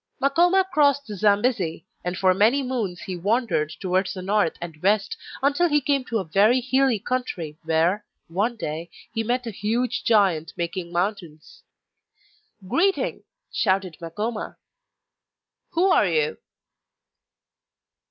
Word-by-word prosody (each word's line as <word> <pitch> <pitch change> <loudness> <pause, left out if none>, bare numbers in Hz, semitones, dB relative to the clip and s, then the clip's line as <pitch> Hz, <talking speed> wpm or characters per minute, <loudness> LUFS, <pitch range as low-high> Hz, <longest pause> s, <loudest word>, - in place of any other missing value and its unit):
Makoma 350 +7 +3
crossed 285 -2 +3
the 210 - -7
Zambesi, 200 -5 +1 0.2
and 180 0 -3
for 185 0 +4
many 225 +9 +3
moons 225 -9 -3
he 185 - -5
wandered 200 - 0
towards 185 +1 0
the 185 - -6
north 200 -3 +2
and 165 -3 -8
west 200 +1 +2 0.3
until 290 +5 +3
he 295 -1 +4
came 280 -1 0
to 230 - -1
a 200 - -1
very 200 +9 +3
hilly 260 -1 +2
country 190 -10 -4
where, 165 +6 +2 0.2
one 205 +8 -1
day, 165 -5 -5 0.2
he 225 -1 -1
met 245 +2 -1
a 230 - -4
huge 235 +5 -1
giant 190 -8 +2
making 170 0 -4
mountains. 175 - -4 1.1
'Greeting,' 385 - +1 0.3
shouted 190 -3 0
Makoma, 210 +7 -4 1.2
'you 355 - +4
are 385 - +4
you? 465 0 0
210 Hz, 130 wpm, -24 LUFS, 180-255 Hz, 1.2 s, for